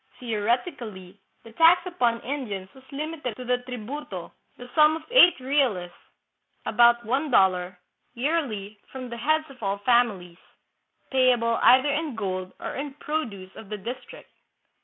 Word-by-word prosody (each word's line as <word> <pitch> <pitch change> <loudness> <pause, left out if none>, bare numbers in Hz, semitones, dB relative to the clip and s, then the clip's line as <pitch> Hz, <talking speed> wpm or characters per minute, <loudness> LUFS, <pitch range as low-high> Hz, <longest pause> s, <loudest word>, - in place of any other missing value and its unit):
Theoretically, 220 - -3 0.2
the 230 - -13
tax 330 +8 +5
upon 245 -10 0
Indians 210 -9 -5
was 265 - -17
limited 295 -4 -4
to 255 - -8
the 250 0 +1
" - - -26
tribute," 250 +5 -6
the 190 +6 -10
sum 305 0 +5
of 320 - -7
eight 355 - +7
reales 255 -10 0 0.7
(about 235 0 +4
one 270 +7 0
dollar) 185 -5 +2 0.4
yearly 235 -8 -2
from 255 -2 -7
the 235 - -6
heads 310 +6 +1
of 265 - -16
all 200 -1 -1
families, 205 -6 +1 0.7
payable 245 -3 +3
either 260 +3 +6
in 295 -2 -2
gold 185 -3 -4
or - - -5
in 275 0 -5
produce 225 -13 -5
of 220 - -11
the 210 - -4
district. 255 - -9
245 Hz, 145 wpm, -25 LUFS, 205-285 Hz, 0.7 s, eight